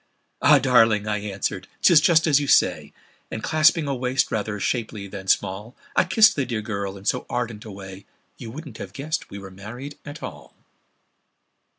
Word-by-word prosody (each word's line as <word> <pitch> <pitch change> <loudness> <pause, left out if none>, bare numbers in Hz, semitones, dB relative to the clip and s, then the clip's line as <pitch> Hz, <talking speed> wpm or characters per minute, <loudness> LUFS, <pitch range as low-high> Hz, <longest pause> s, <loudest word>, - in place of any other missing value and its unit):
"Ah! 145 +1 +7
darling," 115 -5 +3
I 105 -1 -1
answered, 100 -2 -4 0.2
"'tis 170 -4 +7
just 165 +1 +4
as 145 -3 +4
you 145 - -3
say;" - - +2 0.4
And 110 - -6
clasping 155 0 +3
a 140 - 0
waist 125 +1 0
rather 105 -1 -2
shapely 110 -2 -2
than 95 -1 -9
small, 105 +6 0 0.2
I - - +4
kissed 215 +3 +5
the 140 - 0
dear 115 -4 -3
girl 100 -2 -4
in 95 - -14
so 125 - -1
ardent 115 -3 -3
a 110 - -8
way 95 0 -10 0.3
You 115 - -9
wouldn't 140 -1 -9
have 95 - -8
guessed 155 +7 -4
we 100 - -8
were 95 -1 -10
married 120 +9 -9
at 145 +1 -9
all! - - -9
115 Hz, 185 wpm, -23 LUFS, 100-145 Hz, 0.4 s, Ah